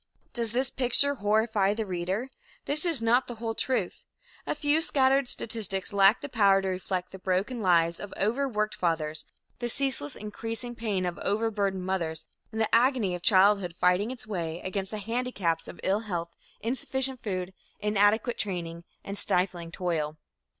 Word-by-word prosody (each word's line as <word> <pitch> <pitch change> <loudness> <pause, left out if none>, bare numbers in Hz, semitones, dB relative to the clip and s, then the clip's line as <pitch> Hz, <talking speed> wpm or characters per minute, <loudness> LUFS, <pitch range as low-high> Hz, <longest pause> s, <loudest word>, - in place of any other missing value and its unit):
Does 230 -3 0
this 255 +2 0
picture 265 +2 +3
horrify 210 -3 +1
the 220 0 -2
reader? 190 +6 -2 0.4
This 300 +4 -1
is 305 -9 +3
not 240 +3 +3
the 240 - -6
whole 225 0 -3
truth. 225 -5 -1 0.4
A - - 0
few 295 +1 +2
scattered 270 -4 +3
statistics 210 -3 -1
lack 200 +3 +5
the 285 - -5
power 200 -7 +4
to - - -1
reflect 185 0 -3
the 190 - -9
broken 195 +7 -1
lives 170 -3 +3
of 205 - -7
overworked 215 -1 0
fathers, 160 -3 -1 0.3
the 240 -1 -1
ceaseless, 260 - +1
increasing 225 +3 -6
pain 210 -6 -2
of 175 -1 -3
overburdened 200 -3 -1
mothers 170 -4 -2 0.3
and 220 - -4
the 220 - 0
agony 235 -5 +3
of 175 - -4
childhood 190 -2 +4
fighting 180 +5 +2
its 250 -3 -6
way 170 -6 -3
against 190 0 -2
the 215 - +1
handicaps 210 -6 -2
of - - -10
ill 195 +2 +2
health, 170 -6 -4 0.3
insufficient 265 +2 -2
food, 185 -3 -3 0.3
inadequate 210 +3 +2
training 170 -4 -3 0.2
and 200 +1 -4
stifling 180 -2 +1
toil. 160 -4 -2
205 Hz, 160 wpm, -28 LUFS, 185-235 Hz, 0.4 s, lack